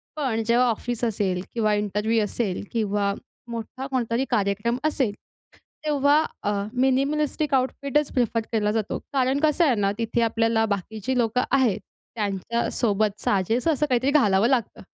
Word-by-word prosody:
पण 255 -7 -1
जेव्हा 240 +2 +4
ऑफिस 240 +1 -3
असेल 195 -5 0
किंवा 215 -2 +1
इंटरव्ह्यू 210 +2 0
असेल 205 -3 -2
किंवा 205 -3 0 0.4
मोठा 235 +3 -5
कोणतरी 255 -1 -1
कार्यक्रम 210 +1 0
असेल, 265 -8 0 0.7
तेव्हा 290 +1 +3 0.2
अ, 205 - +1 0.2
मिनिमलिस्टिक 275 +3 +1
आउटफिटच 280 +2 +1
प्रिफर 235 -2 +1
केला 210 -2 +1
जातो. 220 -1 -2
कारण 265 +1 +2
कसं 310 +2 +3
आहे 260 -6 +3
ना, 200 -1 +1
तिथे 230 +1 -1
आपल्याला 225 0 +2
बाकीचे 215 +4 -3
लोकं 240 +1 +1
आहेत, 255 -7 +3 0.4
त्यांच्यासोबत 210 0 -1
साजेसं 225 - +1
असं 300 +1 0
काहीतरी 260 +3 +2
घालावं 215 -7 +4
लागतं 245 -5 0
235 Hz, 135 wpm, -24 LUFS, 210-265 Hz, 0.7 s, जेव्हा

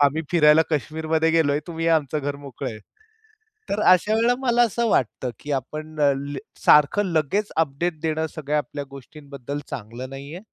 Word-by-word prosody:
आम्ही 145 +3 +3
फिरायला 155 -1 +6
कश्मीरमध्ये 160 +2 0
गेलोय. 150 -3 +2
तुम्ही 165 -1 -4
या. 165 -1 +5
आमचं 150 0 -2
घर 140 0 -3
मोकळं 140 -4 -6
आहे." 110 -1 -9 0.9
तर 205 +1 -1
अशा 185 +4 +4
वेळेला 235 +2 +3
मला 240 -2 +2
असं 235 +1 0
वाटतं 125 - 0
की 145 - -6
आपण 155 +4 -5
ल 140 -1 +4 0.2
ले 135 - -4 0.3
सारखं 150 +8 +5
लगेच 190 +7 0
अपडेट 160 +1 0
देणं 160 -1 -1
सगळ्या 150 -1 -1
आपल्या 145 -1 -4
गोष्टींबद्दल 140 0 -8
चांगलं 120 +3 -7
नाहीये. 140 +5 -8
150 Hz, 165 wpm, -23 LUFS, 140-165 Hz, 0.9 s, फिरायला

